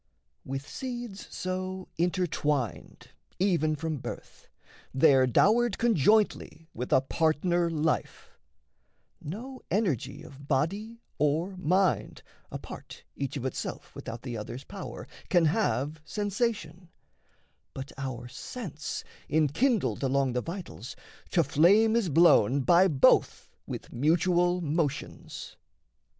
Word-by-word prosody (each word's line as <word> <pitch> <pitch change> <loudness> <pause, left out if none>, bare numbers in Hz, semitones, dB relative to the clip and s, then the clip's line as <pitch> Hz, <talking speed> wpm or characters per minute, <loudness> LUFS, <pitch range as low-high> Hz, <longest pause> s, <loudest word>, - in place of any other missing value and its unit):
With 135 +2 -5
seeds 240 -6 -6
so 185 0 -4
intertwined 155 - -1 0.3
even 170 -5 +2
from 155 0 -3
birth, - - -9 0.5
They're 135 -2 +5
dowered 220 - +3
conjointly 210 - +2
with 125 +2 -5
a - - +5
partner 165 +4 +1
life; 160 -1 -2 0.9
No 245 - -7
energy 150 - -1
of 140 -3 -13
body 200 - -1 0.2
or 160 +6 +1
mind, 185 +1 +1 0.3
apart, - - -9
Each 140 -1 -3
of 125 - -5
itself 130 - -5
without 115 +1 -7
the 125 -3 -5
other's 120 +4 -6
power, 195 +5 -8 0.2
Can 175 -3 +4
have 155 - 0
sensation; 205 -3 -2 0.9
but 135 +1 -6
our 130 -3 -5
sense, 150 - -6 0.3
enkindled 160 - +2
Along 135 -1 +1
the 125 - 0
vitals, 170 - -7 0.3
to 170 - +3
flame 195 +11 +4
is 225 -6 +1
blown 140 -5 +5
by 175 +7 +5
both 140 -7 +3 0.2
With - - -7
mutual 175 +6 +2
motions. 150 -2 -3
165 Hz, 110 wpm, -28 LUFS, 140-190 Hz, 0.9 s, They're